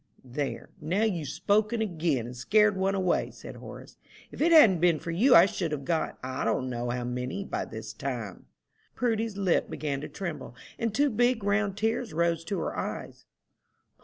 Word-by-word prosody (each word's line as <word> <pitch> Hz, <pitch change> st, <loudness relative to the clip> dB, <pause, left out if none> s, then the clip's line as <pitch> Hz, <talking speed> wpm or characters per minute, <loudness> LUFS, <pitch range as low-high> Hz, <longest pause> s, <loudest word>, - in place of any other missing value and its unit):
"There, 135 Hz, +3 st, -4 dB
now 180 Hz, +8 st, 0 dB
you've 175 Hz, -9 st, -1 dB
spoke 210 Hz, -, +1 dB
again, 170 Hz, -, -1 dB
and 125 Hz, +1 st, -8 dB
scared 205 Hz, -, +3 dB
one 190 Hz, +1 st, 0 dB
away," 185 Hz, -2 st, +1 dB
said -, -, -10 dB
Horace. -, -, -11 dB, 0.3 s
"If -, -, -8 dB
it 335 Hz, +3 st, +4 dB
hadn't 225 Hz, -, +7 dB
been 170 Hz, -1 st, +4 dB
for 165 Hz, -, -5 dB
you 230 Hz, +11 st, +5 dB
I 170 Hz, -, +9 dB
should 175 Hz, -4 st, -2 dB
have 140 Hz, -2 st, -4 dB
got, 160 Hz, +2 st, -1 dB
I 130 Hz, 0 st, -3 dB
don't 125 Hz, +3 st, 0 dB
know 120 Hz, 0 st, -3 dB
how 125 Hz, 0 st, -2 dB
many, 125 Hz, +9 st, -3 dB
by -, -, -3 dB
this -, -, -8 dB
time." -, -, -5 dB, 0.5 s
Prudy's 225 Hz, -4 st, -1 dB
lip 195 Hz, -3 st, +1 dB
began 140 Hz, -3 st, -3 dB
to -, -, -6 dB
tremble, 170 Hz, -9 st, -6 dB, 0.2 s
and 230 Hz, -1 st, 0 dB
two 285 Hz, +6 st, +2 dB
big 240 Hz, 0 st, +2 dB
round 200 Hz, -1 st, +1 dB
tears 225 Hz, -1 st, -1 dB
rose 170 Hz, 0 st, +1 dB
to 200 Hz, +2 st, -2 dB
her -, -, -3 dB
eyes. -, -, -5 dB
185 Hz, 185 wpm, -28 LUFS, 150-215 Hz, 0.5 s, I